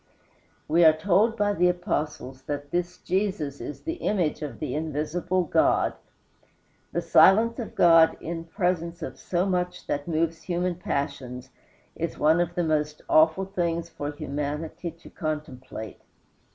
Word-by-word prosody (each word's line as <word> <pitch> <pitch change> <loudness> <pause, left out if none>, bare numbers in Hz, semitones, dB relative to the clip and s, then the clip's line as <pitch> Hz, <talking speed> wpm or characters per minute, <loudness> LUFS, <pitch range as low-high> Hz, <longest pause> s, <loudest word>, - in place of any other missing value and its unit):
We 170 +3 +4
are 155 -1 +7
told 200 +7 +2
by 205 -1 +2
the 180 -2 +3
Apostles 150 -6 -3
that 145 0 -4
this 175 +1 -1
Jesus 185 -7 -2
is 150 - -7
the 330 +2 -3
image 175 -8 0
of 150 -2 -5
the 140 -4 -3
invisible 160 +4 -1
God. 165 - +2 1.0
The - - -2
silence 225 +5 +5
of 230 - -6
God 165 -1 +6
in 165 0 -5
presence 170 -2 -2
of - - -7
so 175 0 0
much 180 -1 -2
that 145 +2 -3
moves 165 0 0
human 180 0 -1
passions 135 -6 -4 0.4
is 165 0 -3
one 160 +3 +4
of 175 0 -2
the 175 - +1
most 150 -1 -1
awful 160 +4 +4
things 170 -3 -2
for 145 -1 -4
humanity 150 +4 -4
to 165 +1 -14
contemplate. 130 -8 -6
165 Hz, 145 wpm, -26 LUFS, 150-180 Hz, 1.0 s, are